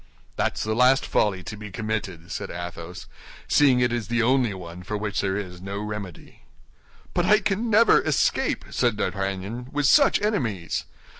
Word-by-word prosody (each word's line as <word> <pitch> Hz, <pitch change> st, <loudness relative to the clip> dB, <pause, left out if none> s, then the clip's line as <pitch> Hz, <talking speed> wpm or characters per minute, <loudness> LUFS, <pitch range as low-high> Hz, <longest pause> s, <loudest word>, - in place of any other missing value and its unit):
"That's -, -, -1 dB
the 110 Hz, -, -1 dB
last 125 Hz, +3 st, +4 dB
folly 95 Hz, -3 st, +1 dB
to 105 Hz, -, -7 dB
be 105 Hz, 0 st, -9 dB
committed," 100 Hz, -5 st, -4 dB
said -, -, -4 dB
Athos, 85 Hz, 0 st, -7 dB, 0.4 s
"seeing 135 Hz, -4 st, +4 dB
it 120 Hz, -1 st, +2 dB
is 120 Hz, -3 st, -2 dB
the 120 Hz, +1 st, +1 dB
only 125 Hz, -2 st, +3 dB
one 90 Hz, -1 st, -9 dB
for 105 Hz, +4 st, -4 dB
which 105 Hz, -1 st, -2 dB
there 95 Hz, 0 st, -1 dB
is 90 Hz, -3 st, -6 dB
no 100 Hz, +1 st, -5 dB
remedy." 105 Hz, -4 st, -7 dB, 0.7 s
"But 175 Hz, 0 st, +1 dB
I 210 Hz, +3 st, +6 dB
can 210 Hz, +3 st, -1 dB
never 225 Hz, +1 st, +5 dB
escape," -, -, 0 dB
said 120 Hz, -4 st, +1 dB
D'Artagnan, 95 Hz, +5 st, -3 dB
"with 145 Hz, 0 st, 0 dB
such 280 Hz, -, +5 dB
enemies. 120 Hz, -, -1 dB
105 Hz, 165 wpm, -24 LUFS, 95-125 Hz, 0.7 s, I